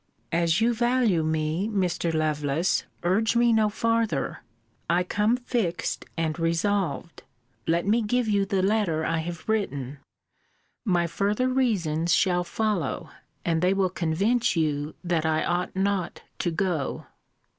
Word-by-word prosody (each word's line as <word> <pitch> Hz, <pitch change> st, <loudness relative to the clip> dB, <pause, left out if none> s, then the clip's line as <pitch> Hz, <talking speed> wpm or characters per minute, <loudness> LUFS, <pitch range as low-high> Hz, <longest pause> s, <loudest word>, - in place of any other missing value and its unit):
As 170 Hz, +1 st, +2 dB
you 235 Hz, +1 st, +3 dB
value 240 Hz, -6 st, +2 dB
me, 160 Hz, +4 st, 0 dB
Mr. 180 Hz, -5 st, 0 dB
Lovelace, 155 Hz, +1 st, 0 dB, 0.2 s
urge 210 Hz, +6 st, +2 dB
me 235 Hz, 0 st, +4 dB
no 215 Hz, -1 st, +3 dB
farther. 225 Hz, -8 st, 0 dB, 0.5 s
I 175 Hz, +2 st, +3 dB
come 210 Hz, +6 st, +1 dB
fixed 240 Hz, -8 st, -2 dB
and 160 Hz, 0 st, -1 dB
resolved. 170 Hz, 0 st, -1 dB, 0.5 s
Let 170 Hz, +2 st, +1 dB
me 220 Hz, +4 st, +3 dB
give 240 Hz, +2 st, 0 dB
you 205 Hz, -2 st, +2 dB
the 195 Hz, -2 st, 0 dB
letter 190 Hz, -6 st, +1 dB
I 165 Hz, -, 0 dB
have 170 Hz, 0 st, -6 dB
written. 145 Hz, -, -2 dB, 0.9 s
My 175 Hz, -4 st, +2 dB
further 205 Hz, +8 st, 0 dB
reasons 175 Hz, -11 st, +1 dB
shall 180 Hz, -2 st, +2 dB
follow; 200 Hz, -6 st, -2 dB, 0.3 s
and 165 Hz, -1 st, +1 dB
they 185 Hz, +2 st, +3 dB
will 190 Hz, -2 st, +1 dB
convince 195 Hz, +8 st, +1 dB
you 150 Hz, -2 st, -1 dB
that 170 Hz, -3 st, 0 dB
I 155 Hz, 0 st, +1 dB
ought 175 Hz, +1 st, -1 dB
not 190 Hz, -2 st, -1 dB, 0.2 s
to 175 Hz, -, 0 dB
go. 165 Hz, -4 st, -2 dB
180 Hz, 135 wpm, -26 LUFS, 165-215 Hz, 0.9 s, me